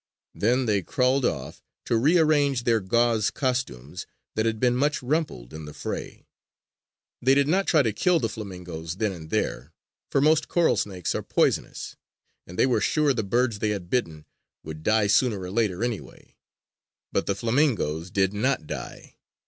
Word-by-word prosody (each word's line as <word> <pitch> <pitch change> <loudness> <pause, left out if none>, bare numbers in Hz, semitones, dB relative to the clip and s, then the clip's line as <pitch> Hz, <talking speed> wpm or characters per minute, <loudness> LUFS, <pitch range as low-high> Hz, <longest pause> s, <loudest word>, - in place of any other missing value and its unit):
Then 125 +5 +1
they 105 -3 +1
crawled 130 - +1
off, - - -3 0.2
to - - +1
rearrange 145 -1 +3
their 115 -2 +3
gauze 115 +2 +2
costumes 90 - -3 0.3
that 110 +1 0
had 110 -1 -1
been 125 0 +2
much 145 +2 0
rumpled 130 - -2
in 80 0 -7
the 75 - -10
fray. - - -6 1.0
They 130 +2 +4
did 140 0 +3
not 190 +5 +1
try 155 -4 +4
to 110 -3 0
kill 175 - +2
the 115 - 0
flamingoes 90 -6 -7
then 105 +1 0
and 80 -4 -9
there; - - -2 0.4
for - - +2
most 155 +1 +3
coral 175 -2 +3
snakes 95 -4 -2
are - - -2
poisonous; - - -1 0.5
and 90 - -10
they - - +4
were 130 - +1
sure 150 -2 +2
the 115 - -1
birds 120 +1 0
they 105 - 0
had 95 -4 -4
bitten 80 -12 -1 0.4
would 80 0 -8
die 110 +4 +2
sooner 105 +1 +2
or 90 -1 -6
later 105 -2 0
anyway. 120 -4 -6 0.8
But - - -1
the 100 - +1
flamingoes 115 - 0
did 95 +1 +1
not 115 - 0
die. - - -8
115 Hz, 170 wpm, -25 LUFS, 95-130 Hz, 1.0 s, They